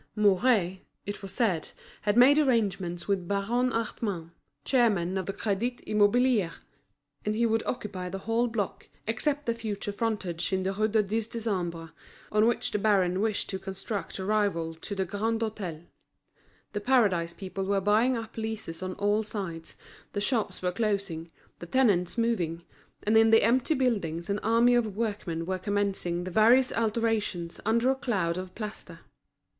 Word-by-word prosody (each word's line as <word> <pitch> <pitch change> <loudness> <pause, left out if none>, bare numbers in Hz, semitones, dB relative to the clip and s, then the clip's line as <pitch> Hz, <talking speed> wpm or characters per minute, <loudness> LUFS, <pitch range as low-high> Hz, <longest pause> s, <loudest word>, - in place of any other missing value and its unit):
Mouret, 200 -2 +3 0.3
it 205 - -5
was 195 -2 -6
said, 195 -9 0 0.3
had 210 +1 +1
made 275 +5 +7
arrangements 200 - 0
with 195 -3 0
Baron 225 +6 +1
Hartmann, 205 -7 -3 0.3
chairman 205 -8 +2
of 190 -2 -2
the - - 0
Crédit 225 +5 -1
Immobilier, 210 -2 +3 0.7
and 210 0 -1
he 235 +2 +2
would 225 0 +2
occupy 195 -6 -4
the 195 - -4
whole 230 +4 0
block, 220 -4 -4 0.2
except 280 +7 0
the 235 - +1
future 215 -3 -4
frontage 200 -6 -2
in 190 -1 0
the 190 +1 -1
Rue 215 +2 +1
du 220 0 +2
Dix 215 +2 -2
Décembre, 180 -8 -3 0.4
on 215 +1 +4
which 235 - 0
the 210 - 0
baron 190 -3 +2
wished 215 -1 0
to 190 - -3
construct 195 0 -4
a 190 - -4
rival 200 -6 0
to 165 +5 -6
the 190 -1 0
Grand 220 +4 -1
Hôtel. 190 -7 -4 0.9
The 205 - -2
Paradise 200 -9 +2
people 190 +1 -5
were 200 0 +2
buying 220 +6 +3
up 225 0 -7
leases 220 -7 -4
on 185 0 -3
all 205 +1 +1
sides, 190 -7 -6 0.4
the 205 - -1
shops 205 -4 0
were 180 - +1
closing, 195 -5 -2 0.3
the 175 - -8
tenants 205 -6 +2
moving; 180 -8 0 0.4
and 215 +2 +2
in 225 0 +6
the 225 0 +6
empty 260 +6 +3
buildings 200 - 0
an 200 - 0
army 230 +3 +4
of 225 -5 +1
workmen 205 -7 -2
were 185 +1 -2
commencing 195 -3 -1
the 185 - -5
various 235 +6 +5
alterations 220 -6 -1
under 235 +3 +3
a - - 0
cloud 185 -10 -1
of 185 0 -8
plaster. 215 -1 -7
205 Hz, 165 wpm, -28 LUFS, 185-225 Hz, 0.9 s, made